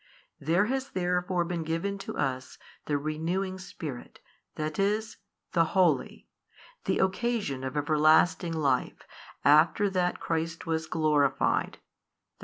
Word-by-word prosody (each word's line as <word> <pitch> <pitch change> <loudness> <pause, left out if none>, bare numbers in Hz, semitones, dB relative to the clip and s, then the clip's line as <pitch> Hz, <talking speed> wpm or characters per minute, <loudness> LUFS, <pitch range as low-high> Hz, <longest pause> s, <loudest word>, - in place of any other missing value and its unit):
There 170 +8 +2
has 265 +3 -2
therefore 180 -1 0
been 170 -1 -3
given 165 +5 -2
to - - -6
us 130 -1 -2 0.3
the 145 - 0
renewing 170 +6 -2
Spirit, 155 -8 -8 0.4
that 155 +1 -4
is, 215 +2 0 0.3
the 165 +2 +1
Holy, 170 -8 +1 0.6
the - - +1
occasion 190 - -1
of 130 +3 -4
everlasting 155 +3 +3
life 140 -5 0 0.4
after 160 +7 +5
that 180 -1 0
Christ 165 0 -3
was 160 -1 -2
glorified, 150 -4 +1
i. - - -40
165 Hz, 120 wpm, -28 LUFS, 150-190 Hz, 0.6 s, after